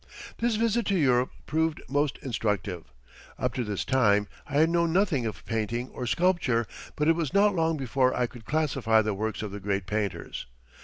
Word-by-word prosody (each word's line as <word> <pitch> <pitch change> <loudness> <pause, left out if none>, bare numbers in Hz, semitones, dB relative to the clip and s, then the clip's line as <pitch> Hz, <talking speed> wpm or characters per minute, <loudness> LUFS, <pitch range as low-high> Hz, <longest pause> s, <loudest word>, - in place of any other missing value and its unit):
This 235 -1 +1
visit 230 +1 +1
to 200 - +2
Europe 130 -5 +3 0.2
proved 160 +1 0
most 145 0 0
instructive. 105 -8 -2 0.5
Up - - -1
to 125 - -1
this 105 -3 -3
time 105 -6 +3 0.2
I 145 - -9
had 160 +3 +4
known 170 -1 +2
nothing 170 - +2
of 105 - -7
painting 115 +3 -2
or 125 - -5
sculpture, 170 -8 +2 0.3
but 150 -1 0
it 165 - +6
was 165 +1 -2
not 205 +1 +5
long 165 -2 +1
before 130 -1 +1
I 125 - +2
could 120 -1 -10
classify 130 -6 +2
the 105 0 -1
works 110 +2 -3
of 105 - -4
the 100 - -6
great 100 -1 -1
painters. 100 - -3
130 Hz, 190 wpm, -27 LUFS, 110-160 Hz, 0.5 s, it